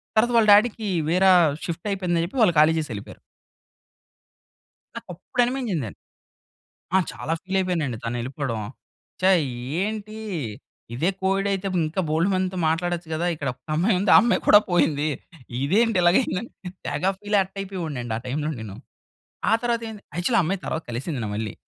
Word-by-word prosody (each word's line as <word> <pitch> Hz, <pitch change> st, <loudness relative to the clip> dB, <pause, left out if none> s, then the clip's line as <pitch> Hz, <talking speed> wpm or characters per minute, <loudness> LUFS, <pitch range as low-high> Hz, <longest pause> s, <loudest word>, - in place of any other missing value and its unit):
తరువాత 240 Hz, +3 st, +3 dB
వాళ్ళ 220 Hz, -, +4 dB
డ్యాడీకి 215 Hz, 0 st, +3 dB, 0.2 s
వేరా 185 Hz, +3 st, +5 dB, 0.3 s
షిఫ్ట్ 170 Hz, +4 st, -5 dB
అయిపోయిందని 180 Hz, -4 st, 0 dB
చెప్పి 190 Hz, +10 st, -8 dB
వాళ్ళు 180 Hz, -, +4 dB
ఖాళీ 155 Hz, +1 st, +6 dB
చేసి 155 Hz, -, -4 dB
వెళ్ళిపోయారు. 105 Hz, -2 st, -8 dB, 1.8 s
నాకప్పుడు 185 Hz, +8 st, -3 dB
అనిపించిందండి. 225 Hz, -, -3 dB, 1.0 s
ఆ! -, -, +7 dB
చాలా 160 Hz, -, -3 dB
ఫీల్ 190 Hz, +1 st, -2 dB
అయిపోయానండి. 165 Hz, -10 st, -1 dB
తను 115 Hz, +1 st, -2 dB
వెళ్ళిపోవడం. 130 Hz, -1 st, -3 dB, 0.6 s
చా! 190 Hz, +1 st, +5 dB, 0.5 s
ఏంటి 215 Hz, +1 st, -4 dB, 0.8 s
ఇదే 160 Hz, +9 st, +1 dB
కోఎడ్ 195 Hz, +1 st, +1 dB
అయితే 195 Hz, 0 st, -2 dB, 0.2 s
ఇంకా 160 Hz, +5 st, -2 dB
బోల్డు 160 Hz, +4 st, +2 dB
మందితో 185 Hz, 0 st, -1 dB
మాట్లాడొచ్చు 175 Hz, +1 st, -1 dB
కదా! 160 Hz, +2 st, -1 dB
ఇక్కడ 145 Hz, -3 st, -4 dB
ఒక 125 Hz, -, -31 dB, 0.2 s
అమ్మాయి 185 Hz, +6 st, +2 dB
ఉంది. 200 Hz, -, +2 dB
ఆ -, -, +11 dB
అమ్మాయి 235 Hz, +1 st, +2 dB
కూడా 205 Hz, -, +9 dB
పోయింది. 155 Hz, -4 st, +2 dB, 0.5 s
ఇదేంటి 210 Hz, +9 st, +2 dB
ఇలాగ 175 Hz, +1 st, +4 dB
అయిందని, 235 Hz, -1 st, -3 dB, 0.4 s
తెగ 145 Hz, -, -3 dB, 0.2 s
ఫీల్, 205 Hz, 0 st, 0 dB
హర్ట్ 195 Hz, +1 st, -3 dB
అయిపోయేవాడినండి. 160 Hz, -, -4 dB
ఆ -, -, -5 dB
టైం‌లో 150 Hz, +4 st, -2 dB
నేను. 105 Hz, -3 st, -7 dB, 0.7 s
ఆ -, -, +2 dB
తరువాతేంటి 230 Hz, -3 st, -2 dB
యాక్చువల్లీ 205 Hz, +7 st, +2 dB
ఆ -, -, +5 dB
అమ్మాయి 185 Hz, +4 st, -1 dB
తరువాత 160 Hz, -, -3 dB
కలిసింది 130 Hz, +4 st, -4 dB
నా -, -, -3 dB
మళ్ళీ. 110 Hz, -1 st, -3 dB
180 Hz, 155 wpm, -24 LUFS, 155-205 Hz, 1.8 s, ఆ